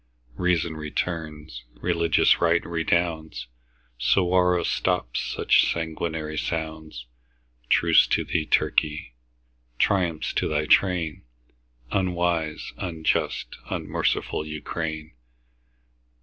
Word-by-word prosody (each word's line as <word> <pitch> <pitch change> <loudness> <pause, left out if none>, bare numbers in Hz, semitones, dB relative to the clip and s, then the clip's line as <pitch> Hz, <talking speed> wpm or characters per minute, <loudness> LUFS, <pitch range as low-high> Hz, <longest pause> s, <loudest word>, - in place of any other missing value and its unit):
Reason 85 0 0
returns, 75 -3 -4
religious 85 -1 +2
right 85 0 +3
redounds, 80 -5 -1 0.5
Suwarrow 90 +5 +3
stops 90 -10 0
such - - +2
sanguinary 80 -1 -3
sounds. 80 -6 -4 0.6
Truce - - +5
to - - +1
thee, 80 -2 -1
Turkey! 75 -4 +1 0.6
Triumph 85 -3 +1
to - - +1
thy 75 -1 0
train, 85 -3 +2 0.7
Unwise, 85 -4 -1
unjust, 80 -3 -2
unmerciful - - -1
Ukraine! 80 0 -5
80 Hz, 80 wpm, -25 LUFS, 75-85 Hz, 0.7 s, Truce